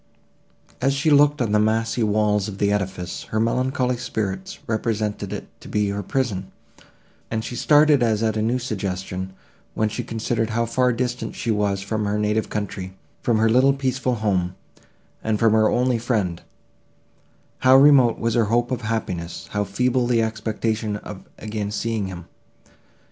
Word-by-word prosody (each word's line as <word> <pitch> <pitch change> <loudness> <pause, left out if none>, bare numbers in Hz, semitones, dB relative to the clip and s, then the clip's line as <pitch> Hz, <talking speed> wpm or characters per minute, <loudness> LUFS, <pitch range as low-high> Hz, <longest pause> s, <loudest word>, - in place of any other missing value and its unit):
As 135 +2 +2
she 150 +3 +1
looked 145 -1 +5
on 110 - -2
the 105 - +4
massy 110 +2 +1
walls 105 -1 +2
of 100 -2 -6
the 100 0 +1
edifice, 95 -3 -3
her 110 - -2
melancholy 125 +2 0
spirits 125 - -4
represented 110 -3 -2
it - - -5
to - - -11
be 105 -1 0
her 100 0 -2
prison; 100 -4 -2 0.8
and 110 0 -2
she 120 - -5
started 150 0 +5
as 110 -2 +2
at 110 -1 +1
a 110 - 0
new 115 +3 +1
suggestion, 95 -5 -4 0.4
when 110 0 +1
she 110 - -4
considered 115 0 -2
how 115 +1 0
far 125 +2 +2
distant 125 +1 -3
she 115 - -1
was 100 -2 0
from 110 +1 -2
her 105 +1 0
native 105 +1 0
country, 95 -3 -4 0.3
from 115 -2 +2
her 110 +1 +3
little 130 +4 +5
peaceful 130 -2 -1
home, 95 -5 0 0.7
and 110 -1 +1
from 115 0 +3
her 110 -1 +4
only 125 -1 +1
friend—how 115 +4 -2
remote 135 -4 +6
was 115 0 -1
her 115 -1 +3
hope 120 +3 +1
of 125 - -1
happiness, 90 -7 -4
how 105 -1 0
feeble 125 +5 0
the 115 -2 +2
expectation 110 -1 -2
of 105 -1 -8 0.2
again 105 -1 -4
seeing 110 -1 -2
him! 90 -2 -8
110 Hz, 165 wpm, -23 LUFS, 105-125 Hz, 0.8 s, remote